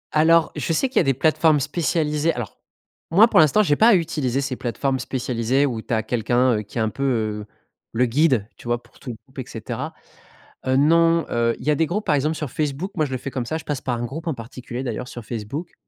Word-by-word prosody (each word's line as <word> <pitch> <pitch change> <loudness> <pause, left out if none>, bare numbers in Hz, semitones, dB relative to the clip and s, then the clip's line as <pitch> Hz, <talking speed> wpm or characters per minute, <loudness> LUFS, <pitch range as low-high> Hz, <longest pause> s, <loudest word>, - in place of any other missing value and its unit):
Alors, 165 +1 +4
je 150 +3 -1
sais 260 - +1
qu'il 260 - -5
y - - +8
a - - +4
des 135 -2 +1
plateformes 155 +1 +3
spécialisées. 150 +1 0
Alors, 120 -6 -6 0.5
moi, 205 +8 +6
pour - - +4
l'instant, 160 +8 +5
j'ai 145 -6 +2
pas 220 +2 +6
eu - - +6
à - - +1
utiliser 140 -5 -1
ces 135 -2 -3
plateformes 130 +2 -2
spécialisées 125 +1 0
où 115 -5 -2
tu - - -11
as 110 -1 +1
quelqu'un, 120 +2 +1
heu, - - -3
qui 105 - -10
est - - +1
un 110 - +1
peu, 140 - -5
heu, 110 -5 -1 0.5
le 125 +2 +3
guide, 130 -4 +2
tu - - -13
vois, 120 0 -1
pour - - -23
tout 130 - -9
le 115 - -5
groupe, - - -12
et - - -4
cetera. - - -5 0.7
Heu, 130 0 +2
non, 165 +3 +4
heu, 115 0 +1
il - - -10
y - - +4
a - - +4
des 160 +2 +1
groupes, 210 +6 -2
par 150 - +2
exemple, 150 +3 +1
sur 150 -5 -4
Facebook, 155 +6 -3
moi, 155 -4 +1
je 135 - -8
le - - 0
fais 135 - -6
comme 125 -3 -3
ça, 160 - -2
je 160 - -6
passe 145 -4 -3
par 125 -2 -2
un 120 - -3
groupe 160 +7 -6
en 160 - 0
particulier, 120 +1 -7
d'ailleurs, 125 0 -4
sur 120 -2 -8
Facebook 120 - -6
135 Hz, 260 wpm, -22 LUFS, 120-160 Hz, 0.7 s, y